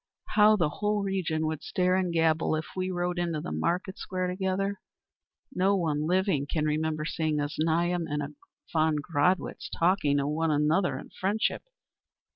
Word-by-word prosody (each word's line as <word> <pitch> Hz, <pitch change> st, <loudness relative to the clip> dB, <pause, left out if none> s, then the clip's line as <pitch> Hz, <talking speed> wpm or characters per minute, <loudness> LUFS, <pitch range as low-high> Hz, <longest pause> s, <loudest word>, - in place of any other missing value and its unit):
"How 210 Hz, 0 st, +6 dB
the 170 Hz, -7 st, +2 dB
whole 210 Hz, +5 st, -1 dB
region 175 Hz, -5 st, -1 dB
would 155 Hz, -1 st, -2 dB
stare 180 Hz, 0 st, +1 dB
and 185 Hz, -2 st, 0 dB
gabble 160 Hz, -1 st, +2 dB
if 155 Hz, 0 st, -3 dB
we 185 Hz, 0 st, -1 dB
rode 175 Hz, -1 st, -1 dB
into 170 Hz, -3 st, -1 dB
the 115 Hz, -, -5 dB
market 175 Hz, -, -1 dB
square 185 Hz, -1 st, -2 dB
together. 190 Hz, +2 st, -1 dB, 0.7 s
No 195 Hz, 0 st, +3 dB
one 155 Hz, -4 st, 0 dB
living 180 Hz, -5 st, +1 dB
can 155 Hz, +1 st, -1 dB
remember 155 Hz, 0 st, -1 dB
seeing 155 Hz, -1 st, -1 dB
a 145 Hz, -, 0 dB
Znaeym 165 Hz, +3 st, 0 dB
and 150 Hz, 0 st, -1 dB
a 145 Hz, +1 st, -6 dB, 0.4 s
von 160 Hz, -1 st, +3 dB
Gradwitz 150 Hz, +4 st, 0 dB
talking 170 Hz, -5 st, +2 dB
to 140 Hz, -, +1 dB
one 160 Hz, +3 st, 0 dB
another 155 Hz, +5 st, +2 dB
in -, -, -10 dB
friendship. 205 Hz, +3 st, -1 dB
170 Hz, 165 wpm, -28 LUFS, 155-185 Hz, 0.7 s, How